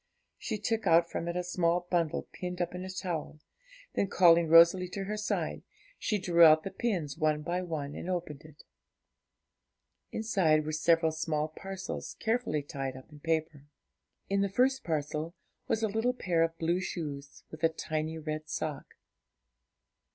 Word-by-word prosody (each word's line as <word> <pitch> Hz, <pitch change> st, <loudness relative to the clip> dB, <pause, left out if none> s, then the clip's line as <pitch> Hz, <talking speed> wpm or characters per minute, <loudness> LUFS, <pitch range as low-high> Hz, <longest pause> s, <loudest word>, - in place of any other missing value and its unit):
She 220 Hz, -, -3 dB
took 225 Hz, -1 st, -1 dB
out 170 Hz, 0 st, +4 dB
from 170 Hz, -, -3 dB
it 170 Hz, -, -2 dB
a 180 Hz, -, -1 dB
small 175 Hz, -1 st, +1 dB
bundle 170 Hz, -3 st, +1 dB
pinned 180 Hz, 0 st, -5 dB
up 175 Hz, -, -1 dB
in 180 Hz, 0 st, -5 dB
a 190 Hz, -, -6 dB
towel, 175 Hz, -5 st, -4 dB, 0.5 s
then, 200 Hz, -, +1 dB
calling 170 Hz, -3 st, +5 dB
Rosalie 170 Hz, +3 st, +6 dB
to 195 Hz, +2 st, -4 dB
her 210 Hz, +2 st, -3 dB
side, 210 Hz, 0 st, -2 dB, 0.4 s
she 210 Hz, -, 0 dB
drew 175 Hz, -3 st, +4 dB
out 155 Hz, -1 st, +8 dB
the 195 Hz, -, -5 dB
pins 180 Hz, -, -2 dB
one 155 Hz, -1 st, +1 dB
by 175 Hz, +3 st, -1 dB
one, 155 Hz, -5 st, -4 dB
and 175 Hz, -, -6 dB
opened 170 Hz, -5 st, -3 dB
it. 155 Hz, -1 st, -15 dB, 1.5 s
Inside 175 Hz, -9 st, +2 dB
were 155 Hz, -, -2 dB
several 160 Hz, +1 st, +3 dB
small 155 Hz, -1 st, -1 dB
parcels 190 Hz, +4 st, -6 dB
carefully 225 Hz, -10 st, 0 dB
tied 135 Hz, -2 st, -5 dB
up 130 Hz, -, -14 dB
in 150 Hz, -, -13 dB
paper. 155 Hz, -2 st, -2 dB, 0.6 s
In 200 Hz, 0 st, +1 dB
the 200 Hz, -, +1 dB
first 255 Hz, +6 st, +2 dB
parcel 155 Hz, +1 st, -2 dB, 0.3 s
was 225 Hz, -, 0 dB
a -, -, +3 dB
little 225 Hz, +4 st, 0 dB
pair 175 Hz, -8 st, 0 dB
of 165 Hz, 0 st, +1 dB
blue 170 Hz, +2 st, +1 dB
shoes, 145 Hz, -6 st, -6 dB
with 155 Hz, +1 st, -10 dB
a 165 Hz, -, +6 dB
tiny 155 Hz, 0 st, -3 dB
red 155 Hz, 0 st, -5 dB
sock. 150 Hz, -3 st, -4 dB
165 Hz, 165 wpm, -30 LUFS, 155-185 Hz, 1.5 s, out